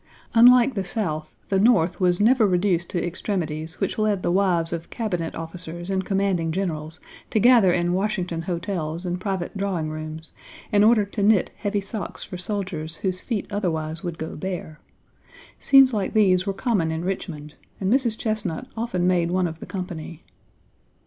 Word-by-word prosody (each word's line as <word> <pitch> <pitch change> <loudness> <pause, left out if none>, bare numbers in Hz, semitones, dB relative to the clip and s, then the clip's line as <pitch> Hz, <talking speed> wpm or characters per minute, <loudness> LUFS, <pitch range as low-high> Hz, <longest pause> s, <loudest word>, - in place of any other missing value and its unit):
Unlike 245 +2 +7
the 195 -4 -2
South, 160 -6 -3 0.2
the 195 - +2
North 190 -6 +3
was 180 -2 +2
never 225 +1 +5
reduced 180 -2 +1
to 175 - -1
extremities 165 -3 -3
which - - -2
led 210 -3 +1
the - - +1
wives 175 -3 +2
of 165 0 -5
Cabinet 180 -8 -3
officers 170 +2 -6
and 190 0 0
commanding 190 -4 0
generals 160 -3 -3 0.3
to - - 0
gather 230 -4 +6
in 175 0 +1
Washington 185 -4 -1
hotels 170 -1 -3
and 180 0 -3
private 190 -2 -3
drawing 185 -6 -2
rooms, 155 +1 -7 0.4
in 205 0 +4
order 215 -1 +5
to 200 +1 -5
knit 205 -2 +3
heavy 205 -1 -1
socks 200 +1 -5
for 180 - -7
soldiers 180 -5 -3
whose 185 -1 -1
feet 225 -5 -2
otherwise 160 -5 -2
would 175 -4 -5
go 160 - -5
bare: 155 -3 -5 0.8
scenes 270 -2 +6
like 205 -3 -1
these 190 -3 +3
were - - +2
common 200 -6 0
in 160 +2 -3
Richmond, 160 -6 -4 0.3
and 195 +3 +1
Mrs. 245 -5 +1
Chesnut 215 -1 -2
often 225 -6 -1
made 175 -2 +2
one 185 +1 +1
of 160 -1 -4
the - - -9
company. 175 -4 -6
185 Hz, 170 wpm, -24 LUFS, 165-205 Hz, 0.8 s, Unlike